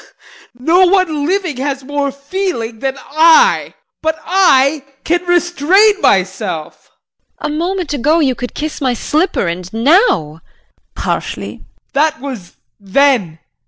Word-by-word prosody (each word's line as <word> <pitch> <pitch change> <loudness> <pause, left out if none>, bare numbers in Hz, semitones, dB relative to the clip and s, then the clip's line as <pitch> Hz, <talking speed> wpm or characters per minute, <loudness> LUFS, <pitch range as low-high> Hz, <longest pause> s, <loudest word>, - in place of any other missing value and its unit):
No 340 +8 +3
one 340 -6 +1
living 365 -6 -1
has 275 0 -3
more 285 0 -2
feeling 280 - -4
than 270 +1 -3
I 330 - +3 0.3
but 315 0 -1
I 305 -6 +3 0.2
can 345 +2 0
restrain 350 +4 +3
myself. 190 -4 -1 0.5
JULIE. 295 - -3
A - - -4
moment 350 -1 -2
ago 295 +4 +2
you 275 -5 +2
could 245 0 -7
kiss 310 0 -5
my 255 -3 0
slipper 310 - -1
and 175 +2 -5
now 225 - +2 0.6
JEAN - - -5
[Harshly]. - - -4 0.3
That 310 +2 +1
was 250 -10 -8 0.3
then. 200 - +1
290 Hz, 125 wpm, -15 LUFS, 245-345 Hz, 0.6 s, No